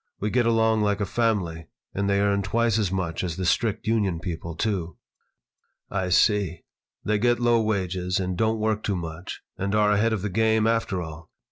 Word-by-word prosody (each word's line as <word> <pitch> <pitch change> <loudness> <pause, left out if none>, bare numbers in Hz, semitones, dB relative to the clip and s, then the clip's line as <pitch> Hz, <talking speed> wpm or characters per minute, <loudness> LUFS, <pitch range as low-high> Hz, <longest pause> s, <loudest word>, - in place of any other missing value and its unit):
We 105 +1 -2
get 120 -1 +2
along 110 -1 +3
like 105 0 +1
a 100 - 0
family, 95 -8 -1 0.3
and 100 0 -1
they 100 0 +2
earn 100 0 +2
twice 115 +2 +1
as 100 -4 0
much 95 -3 -2
as 85 -3 -3
the 95 - -2
strict 110 +5 0
union 105 -6 +1
people, 85 -1 -5
too." 90 -6 -2 0.9
"I 95 -1 -1
see. 95 -2 +2 0.4
They 105 0 +1
get 120 +2 +2
low 120 -1 +3
wages 95 -4 -1
and 90 -1 -2
don't 110 +4 +1
work 110 -1 0
too 100 - -1
much 85 0 -6 0.2
and 100 +2 -1
are 105 -1 +4
ahead 105 +3 +2
of 105 -4 -2
the 105 - -1
game, 110 +2 +2
after 115 -5 0
all. 80 0 -10
100 Hz, 195 wpm, -25 LUFS, 90-110 Hz, 0.9 s, are